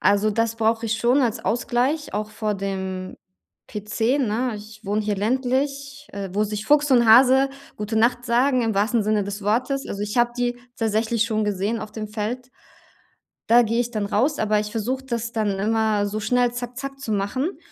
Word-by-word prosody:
Also 205 +1 +3
das 230 +1 0
brauche 225 0 +1
ich 220 0 0
schon 245 +5 +3
als 240 -2 -1
Ausgleich, 245 +4 0
auch 215 +1 -2
vor 215 -1 -2
dem 190 -1 -4 0.5
PC, 220 +5 -1
ne? 245 -1 0
Ich 215 +1 -12
wohne 210 +2 0
hier 205 -1 -1
ländlich, 270 +5 -1
äh, 200 -2 -5
wo 210 +2 +1
sich 210 0 -4
Fuchs 295 +3 +3
und 245 -2 +5
Hase 260 +4 +6 0.3
„gute 210 +1 -3
Nacht“ 240 +2 +2
sagen 250 +2 +2
im 225 -2 0
wahrsten 220 +3 +2
Sinne 210 -1 +1
des 200 +1 -5
Wortes, 250 +7 0
also, 200 - -5
ich 210 +3 -4
habe 240 0 +3
die 245 0 0 0.2
tatsächlich 225 0 +1
schon 215 -2 0
gesehen 205 +3 -1
auf 210 - -8
dem 215 -1 -5
Feld. 235 +4 -4 1.0
Da 235 +1 +7
gehe 230 +1 0
ich 240 - -1
dann 215 -4 -2
raus, 255 +9 +1
aber 215 -1 +2
ich 210 - -4
versuche, 250 +4 -2
das 235 -3 -3
dann 210 -4 -1
immer 215 0 +1
so 210 +1 -3
schnell 245 +2 +2
zack 245 0 -6
zack 275 0 -6
zu 225 - -3
machen, 255 - -1
225 Hz, 195 wpm, -23 LUFS, 210-250 Hz, 1.0 s, Da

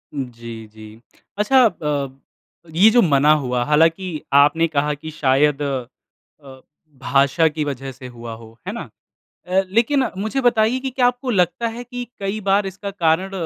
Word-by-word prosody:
जी, 115 -4 -7
जी। 110 +1 -14 0.4
अच्छा 260 +6 +3
अ, 150 - -1 0.7
ये 195 +6 +7
जो 240 +1 +5
मना 150 -4 +4
हुआ 125 -1 -1
हालाँकि 165 +5 +2 0.3
आपने 150 +4 +5
कहा 150 -1 0
की 155 +2 -8
शायद 145 0 +2
अ, 135 0 -8 0.4
भाषा 140 +5 +2
की 155 0 -2
वजह 135 -1 -5
से 125 0 -11
हुआ 120 -2 -9
हो, 115 0 -15
है - - -3
ना? - - -7 0.6
अ, 185 +1 +2
लेकिन 240 +7 +2
मुझे 220 +7 -2
बताइए 240 0 +2
की 265 +1 -3
क्या 250 -1 +2
आपको 250 +1 -2
लगता 185 +4 +1
है 230 +2 -6
कि 245 0 -7
कई 200 +2 -3
बार 200 0 +2
इसका 195 +1 -6
कारण 180 0 0
160 Hz, 160 wpm, -20 LUFS, 135-210 Hz, 0.7 s, ये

